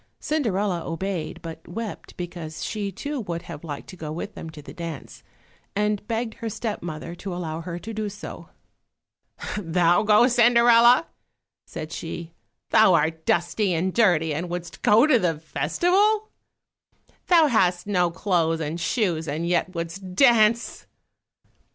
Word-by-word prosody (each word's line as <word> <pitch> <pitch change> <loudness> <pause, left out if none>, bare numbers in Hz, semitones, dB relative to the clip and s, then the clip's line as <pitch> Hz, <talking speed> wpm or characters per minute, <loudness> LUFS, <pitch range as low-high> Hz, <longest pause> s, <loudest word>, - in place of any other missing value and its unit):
Cinderella 205 - -1
obeyed, 175 0 -4
but 165 -1 -9
wept, 215 +4 -7
because 170 -3 -6
she 205 -2 -3
too 285 +9 -4
would 170 -6 -4
have 150 - -9
liked 145 -4 -7
to - - -9
go 155 -3 -6
with 170 +6 -5
them 165 - -8
to 160 -1 -11
the 145 - -11
dance, 165 -4 -7 0.5
and 210 0 0
begged 225 0 -2
her 230 - -3
step 215 0 -4
mother 165 0 -6
to 190 +2 -7
allow 165 -2 -4
her 170 0 -5
to 225 +6 -7
do 215 -1 -3
so. 205 +1 -9 1.1
"Thou 175 -1 +3
go, 215 +2 +5
Cinderella!" 240 +2 +6 0.6
said 155 +1 -7
she; 165 0 -6 0.4
"Thou 205 -5 +6
art 160 +1 0
dusty 175 +2 +1
and 180 +3 -1
dirty 175 -9 +3
and 170 +4 -3
wouldst 175 -1 -6
go 225 +5 +5
to 300 -6 +4
the 170 -5 0
festival? 380 - +1 1.0
Thou 335 -3 +6
hast 185 -10 +2
no 180 -4 +2
clothes 170 -3 0
and 160 +2 -3
shoes, 170 -3 0
and 155 +4 -2
yet 180 +1 0
wouldst 180 +3 -5
dance!" 230 -1 +3
180 Hz, 150 wpm, -24 LUFS, 165-220 Hz, 1.1 s, Cinderella